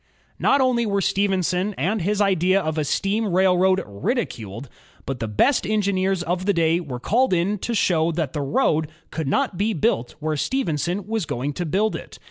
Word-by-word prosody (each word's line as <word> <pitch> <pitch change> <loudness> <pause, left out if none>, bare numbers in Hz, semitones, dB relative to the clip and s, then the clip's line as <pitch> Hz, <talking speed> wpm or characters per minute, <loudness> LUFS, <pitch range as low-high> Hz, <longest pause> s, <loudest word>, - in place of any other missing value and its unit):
Not 275 - +3
only 245 -3 +2
were 200 -1 +1
Stephenson 190 0 0
and 195 +8 0
his 205 +4 0
idea 190 -1 +3
of 155 -3 -2
a - - +1
steam 200 +8 0
railroad 185 +1 +3
ridiculed, 115 - -4 0.4
but 135 -2 -4
the 115 - -2
best 110 - +2
engineers 195 -3 +1
of 180 +2 -2
the 205 - +4
day 165 -1 +2
were 135 -8 -6
called 235 - +2
in 185 +4 +1
to 235 +4 -2
show 170 -5 +2
that 155 -5 -2
the 150 - -2
road 150 +2 +1 0.2
could 160 -4 -3
not 175 +6 0
be 215 +2 +1
built 120 - 0
where 155 0 -1
Stephenson 180 - -1
was 220 -5 -2
going 135 +4 -3
to 175 +3 -3
build 210 +7 +1
it. - - -9
185 Hz, 185 wpm, -23 LUFS, 155-205 Hz, 0.4 s, the